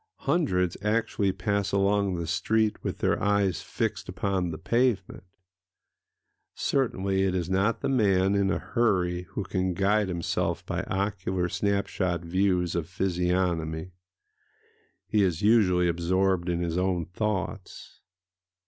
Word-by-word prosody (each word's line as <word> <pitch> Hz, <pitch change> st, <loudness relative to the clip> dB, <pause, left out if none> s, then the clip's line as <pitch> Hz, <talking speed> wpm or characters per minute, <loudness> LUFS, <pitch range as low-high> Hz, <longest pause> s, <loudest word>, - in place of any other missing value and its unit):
Hundreds 135 Hz, -, +1 dB
actually 105 Hz, -2 st, +1 dB
pass 100 Hz, 0 st, -1 dB
along 100 Hz, -1 st, +2 dB
the 85 Hz, -1 st, -3 dB
street 105 Hz, +5 st, 0 dB
with -, -, -3 dB
their -, -, 0 dB
eyes 100 Hz, -2 st, +1 dB
fixed 105 Hz, +3 st, -3 dB
upon 95 Hz, -1 st, -1 dB
the 80 Hz, -, -5 dB
pavement. 115 Hz, -4 st, 0 dB, 1.3 s
Certainly 100 Hz, -8 st, 0 dB
it 95 Hz, -1 st, +1 dB
is 90 Hz, 0 st, -2 dB
not 100 Hz, +4 st, +1 dB
the -, -, -1 dB
man 100 Hz, -7 st, +3 dB
in 100 Hz, -1 st, +2 dB
a 100 Hz, -, +1 dB
hurry 90 Hz, -7 st, 0 dB
who 105 Hz, -, -2 dB
can 95 Hz, -1 st, -1 dB
guide 100 Hz, +2 st, +2 dB
himself 85 Hz, -2 st, -2 dB
by -, -, -2 dB
ocular 95 Hz, -2 st, -1 dB
snap 100 Hz, +2 st, 0 dB
shot 90 Hz, -3 st, -2 dB
views 90 Hz, 0 st, +1 dB
of 85 Hz, -1 st, -2 dB
physiognomy;—he 90 Hz, -3 st, -1 dB, 1.3 s
is 90 Hz, -3 st, 0 dB
usually 95 Hz, -5 st, +4 dB
absorbed 90 Hz, +1 st, +1 dB
in 85 Hz, 0 st, 0 dB
his 85 Hz, +1 st, -1 dB
own 90 Hz, -3 st, 0 dB
thoughts.... 95 Hz, 0 st, -4 dB
95 Hz, 130 wpm, -27 LUFS, 90-100 Hz, 1.3 s, usually